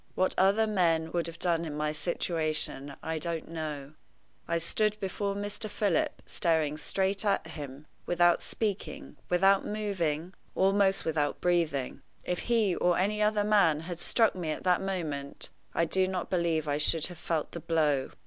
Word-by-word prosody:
What 185 - +2
other 200 +4 +4
men 165 -6 +1
would 170 -2 -1
have 165 0 -8
done 170 -1 +1
in 150 -3 -5
my 150 0 0
situation 155 -4 -1
I 160 0 -2
don't 165 0 -4
know. 155 -3 -5 0.5
I 170 - +1
stood 215 +5 0
before 200 0 -2
Mr. 205 +2 -4
Philip, 200 -5 0
staring 160 -4 +1
straight 195 +5 0
at 200 -4 +1
him, 145 -3 -8 0.2
without 175 0 +4
speaking, 210 -3 -4
without 195 +2 +4
moving, 185 -6 -2 0.2
almost 195 0 +3
without 150 -2 0
breathing. 160 -7 0 0.2
If 180 - -2
he 220 -5 +3
or 175 -1 +2
any 210 +3 +1
other 210 0 +3
man 200 -8 +4
had 175 0 -6
struck 225 +3 +3
me 175 -4 -4
at 155 - -3
that 180 0 +3
moment, 160 -8 -3 0.3
I 170 - +3
do 185 +3 +2
not 185 -1 -3
believe 170 -4 +1
I 145 0 0
should 160 +1 +1
have 175 -2 -7
felt 165 -3 -2
the 170 - -6
blow. 155 -5 +1
170 Hz, 165 wpm, -29 LUFS, 155-195 Hz, 0.5 s, other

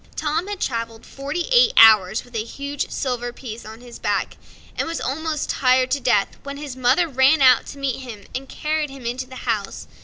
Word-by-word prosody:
Tom 310 +4 -1
had 410 -2 -5
traveled 230 -2 -3
forty 285 +5 -4
eight 485 -1 +5
hours 215 -2 +7
with 245 - -20
a 215 - -1
huge 280 +4 -5
silver 245 -3 -3
piece 235 -2 -9
on 220 +2 -10
his 245 -1 -12
back, - - -1 0.4
and - - -2
was 330 0 -3
almost 305 +3 -2
tired 255 0 +2
to 280 - +1
death, 205 -6 +1
when 280 0 -7
his 285 -3 -7
mother 260 +7 +2
ran 270 +2 +4
out 255 -2 +5
to - - -9
meet 275 -3 -2
him 230 -6 -9
and 265 +1 -5
carried 305 -1 -2
him 270 -3 -11
into 250 +2 -3
the 260 - -11
house. 215 -5 -2
260 Hz, 205 wpm, -22 LUFS, 240-290 Hz, 0.4 s, hours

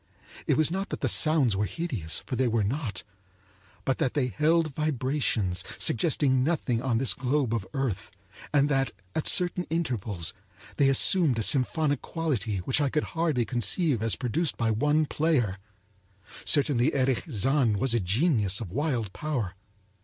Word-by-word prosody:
It - - +2
was 155 0 +2
not 195 +2 -3
that - - -5
the - - +1
sounds 150 -9 +3
were 105 +1 0
hideous, 120 - -3
for - - -4
they 130 0 +1
were 115 -2 +1
not; 110 -3 -3 0.8
but 135 - 0
that 130 - 0
they 130 -4 +1
held 155 - +1
vibrations 130 -10 -1
suggesting 130 -2 +2
nothing 135 -6 0
on 125 -3 0
this 130 +1 +3
globe 130 -2 -1
of 105 -5 -2
earth, 125 -8 -2 0.4
and 145 -1 +3
that 135 -3 0 0.2
at 160 - 0
certain 180 0 +3
intervals 115 - -2 0.4
they 140 -1 +4
assumed 145 - +4
a 110 - 0
symphonic 145 +3 +1
quality 125 - -2
which 135 +3 +1
I 145 - +1
could 150 +2 0
hardly 160 -8 0
conceive 125 - 0
as 115 -1 +1
produced 145 +6 -1
by 115 -2 +1
one 150 +7 +2
player. 135 - 0 0.9
Certainly, 145 -1 +2
Erich 130 -2 +1
Zann 125 -1 +1
was 120 +4 +1
a 120 - +2
genius 105 - +1
of 105 -7 -7
wild 125 - -2
power. 130 -12 -3
130 Hz, 160 wpm, -27 LUFS, 115-150 Hz, 0.9 s, they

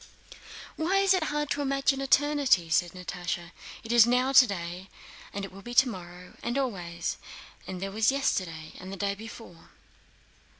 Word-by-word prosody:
"Why 350 +5 +1
is 390 -1 +4
it 365 -4 +1
hard 295 -1 -2
to 290 - 0
imagine 275 0 +1
eternity?" 275 - +3
said 175 +1 +2
Natásha. 175 -1 -5 0.3
"It 225 - -5
is 235 -1 +7
now 250 +2 +2
today, 190 -8 +3 0.4
and 200 0 -4
it - - -11
will 195 +1 -12
be 240 +3 -8
tomorrow, 180 -8 0
and 240 +3 -2
always; 175 -10 -3 0.5
and 185 - -5
there 195 +1 -4
was 220 +4 +3
yesterday, 175 - -2
and 185 +1 -8
the 195 - -6
day 200 +1 0
before...." 210 -4 -11
210 Hz, 160 wpm, -28 LUFS, 180-270 Hz, 0.5 s, is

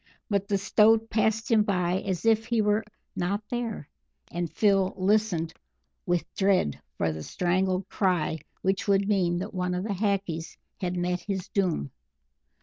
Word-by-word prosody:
But 200 -1 +1
the 200 - +1
Stoat 220 +3 +4
passed 220 +2 +1
by 180 -2 +1
him - - -10
as 185 +2 -2
if 225 0 +3
he 235 -1 +1
were 210 +1 +2 0.3
not 200 +4 -1
there, 235 -10 -3 0.4
and 175 -1 -3
Phil 195 -3 +2
listened 185 -4 +1 0.5
with 175 -1 +1
dread 190 - +1 0.2
for 80 - +1
the 80 0 -6
strangled 185 - 0
cry 175 -5 0 0.2
which 190 +1 0
would 200 0 +3
mean 180 -4 +2
that 195 +5 -4
one 180 -1 -1
of 180 - -2
the 210 -1 -2
Hackees 195 -5 -2 0.2
had 180 -2 -2
met 180 0 0
his 190 0 -4
doom. 175 - 0
190 Hz, 155 wpm, -27 LUFS, 175-210 Hz, 0.5 s, Stoat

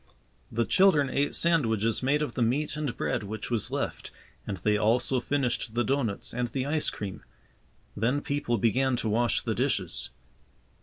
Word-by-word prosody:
The 115 +1 +1
children 150 - +4
ate 140 +1 0
sandwiches 115 -10 +2
made 145 +3 +2
of 150 - -4
the 125 - -3
meat 135 +7 +1
and 150 -5 -3
bread - - -1
which 110 +3 -6
was 115 -4 +1
left - - -3 0.4
and 100 - -3
they 105 +4 +1
also 120 +5 +2
finished 125 -4 -1
the 120 - +2
doughnuts 130 -7 -1
and 125 0 -1
the 130 +2 -3
ice 150 +1 0
cream. 100 -2 -6 0.7
Then 125 +7 +1
people 140 -5 -1
began 125 +5 +2
to 115 -2 -2
wash 115 +1 +1
the - - -1
dishes. - - -1
120 Hz, 165 wpm, -28 LUFS, 110-140 Hz, 0.7 s, children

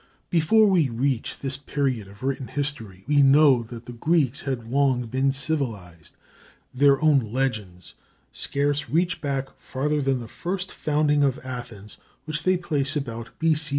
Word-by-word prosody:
Before 175 +7 +4
we 180 -9 +3
reach 125 +1 -1
this 135 -1 -3
period 135 -6 -2
of 100 +4 -15
written 135 -1 -2
history 115 -10 -4
we 145 -1 +4
know 135 -2 +6
that 115 0 -10
the 125 - -8
Greeks 140 0 +1
had 130 -4 -4
long 135 -3 +2
been 130 +4 +1
civilized. 115 - -3 0.6
Their 140 +1 +4
own 150 -3 +5
legends 110 -9 -3 0.4
scarce 145 +1 -1
reach 170 +1 0
back 135 -2 -3
farther 150 +3 -1
than 135 -2 +1
the 115 - -8
first 180 - -4
founding 150 -1 +1
of 135 -1 +2
Athens, 120 -5 -8 0.3
which 155 -1 -2
they 185 +3 +2
place 150 -5 -1
about 115 -5 -4
B.C. 155 -2 +2
135 Hz, 150 wpm, -24 LUFS, 120-150 Hz, 0.6 s, know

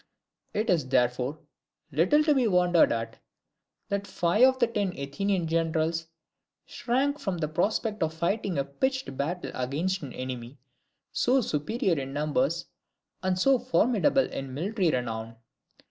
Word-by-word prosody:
It 215 +1 0
is 155 -7 +1
therefore, 125 +2 +1 0.5
little 180 - +4
to 300 -1 +4
be 260 -4 +2
wondered 180 -3 +4
at, 115 -1 -3 0.7
that 200 0 -2
five 175 +6 +1
of 260 0 +2
the 250 - +4
ten 205 -5 -2
Athenian 175 +7 -1
generals 165 0 0 0.6
shrank 275 +4 -1
from 195 -10 -2
the 155 -2 -1
prospect 210 +6 -1
of 160 -1 +1
fighting 175 +2 -1
a 140 - +2
pitched 260 - -2
battle 165 +7 -3
against 155 +10 -1
an 140 -4 -7
enemy 130 0 -6 0.5
so 255 +2 +3
superior 180 - 0
in 135 0 -6
numbers, 155 - 0 0.6
and 185 -1 0
so 265 +7 +4
formidable 255 +2 +2
in 135 -1 -6
military 190 +3 0
renown. 115 -4 -3
175 Hz, 140 wpm, -28 LUFS, 140-220 Hz, 0.7 s, little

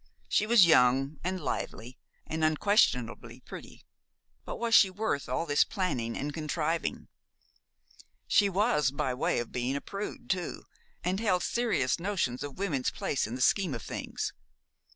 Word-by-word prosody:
She 210 - +1
was 225 -5 +7
young, 135 -1 +4
and 185 +1 -2
lively, 125 -6 -5 0.3
and 160 0 -3
unquestionably 155 - +1
pretty; - - -11 0.6
but - - -5
was 230 0 -2
she 195 - +7
worth 185 - -2
all 130 +6 -1
this 145 -2 +4
planning 125 - -2
and 145 +1 -3
contriving? 160 +1 -2 1.2
She 200 -1 +4
was 195 - +2
by 140 -1 -2
way 125 - 0
of 120 - -3
being 125 +2 -1
a - - -1
prude 200 +1 -6
too, 180 -2 -2 0.4
and 185 +2 0
held 185 -5 +1
serious 235 -3 0
notions 170 -10 -1
of 145 -2 -6
women's 165 -10 0
place 135 - -2
in 115 - -5
the 130 - -5
scheme 175 0 +2
of 115 - -7
things. - - -4
160 Hz, 150 wpm, -29 LUFS, 130-195 Hz, 1.2 s, was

